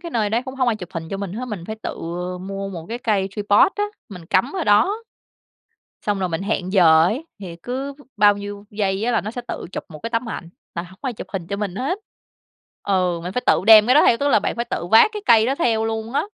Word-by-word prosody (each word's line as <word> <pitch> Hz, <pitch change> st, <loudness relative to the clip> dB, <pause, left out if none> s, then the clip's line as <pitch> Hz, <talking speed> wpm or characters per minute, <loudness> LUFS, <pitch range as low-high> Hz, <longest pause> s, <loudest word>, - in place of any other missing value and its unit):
cái 340 Hz, -1 st, -7 dB
nơi 215 Hz, -3 st, 0 dB
đấy 230 Hz, +3 st, +1 dB
cũng 260 Hz, 0 st, -7 dB
hông 255 Hz, -2 st, +1 dB
ai 220 Hz, -, +1 dB
chụp 180 Hz, -4 st, -8 dB
hình 165 Hz, -1 st, -5 dB
cho 195 Hz, -, -2 dB
mình 195 Hz, -2 st, -5 dB
hết. 235 Hz, +5 st, -4 dB
Mình 200 Hz, -7 st, -6 dB
phải 220 Hz, -, -5 dB
tự -, -, -4 dB, 0.4 s
mua 195 Hz, +1 st, -5 dB
một 170 Hz, -4 st, -7 dB
cái 235 Hz, -, -4 dB
cây 205 Hz, -5 st, 0 dB
tripod 205 Hz, -, +3 dB
á, 415 Hz, -, +1 dB, 0.2 s
mình 180 Hz, -6 st, -10 dB
cắm 215 Hz, +11 st, +1 dB
ở 365 Hz, -4 st, -2 dB
đó. 375 Hz, -, +3 dB, 1.0 s
Xong 205 Hz, -1 st, -1 dB
rồi 185 Hz, -1 st, -1 dB
mình 165 Hz, +2 st, -3 dB
hẹn 190 Hz, -1 st, -2 dB
giờ 160 Hz, -5 st, +6 dB
ấy, 255 Hz, -, -1 dB
thì 175 Hz, -4 st, -8 dB
cứ 270 Hz, +3 st, -4 dB, 0.2 s
bao 205 Hz, -1 st, +5 dB
nhiêu 205 Hz, 0 st, -7 dB
giây 200 Hz, -1 st, -1 dB
á 245 Hz, -, +1 dB
là -, -, +2 dB
nó 215 Hz, -, -5 dB
sẽ 245 Hz, -, -5 dB
tự -, -, -5 dB
chụp -, -, -5 dB
một 155 Hz, -4 st, -10 dB
cái 230 Hz, -, -4 dB
tấm 230 Hz, +1 st, -1 dB
ảnh, 170 Hz, -, -6 dB, 0.3 s
là 170 Hz, -, -3 dB
hổng 185 Hz, +2 st, -14 dB
có 270 Hz, -, -1 dB
ai -, -, -2 dB
chụp 225 Hz, -, -8 dB
hình 185 Hz, -4 st, -4 dB
cho 200 Hz, +3 st, -3 dB
mình 200 Hz, -3 st, -3 dB
hết. 275 Hz, -, -2 dB, 0.8 s
Ừ, 180 Hz, -3 st, 0 dB
mình 180 Hz, +2 st, -5 dB
phải 250 Hz, -, -2 dB
tự -, -, +4 dB
đem 220 Hz, -1 st, +9 dB
cái 255 Hz, -, +4 dB
đó 300 Hz, -, +7 dB
theo, 230 Hz, -, +5 dB
tức 280 Hz, +4 st, 0 dB
là 280 Hz, -, +5 dB
bạn 205 Hz, -, -2 dB
phải 235 Hz, -, -1 dB
tự 175 Hz, -, -2 dB
vác 225 Hz, -, +7 dB
cái 420 Hz, -1 st, -6 dB
cây 225 Hz, -1 st, +6 dB
đó 265 Hz, -, +1 dB
theo 230 Hz, -7 st, +1 dB
luôn 225 Hz, 0 st, -3 dB
á. 280 Hz, -, +1 dB
210 Hz, 270 wpm, -21 LUFS, 190-245 Hz, 1.0 s, đem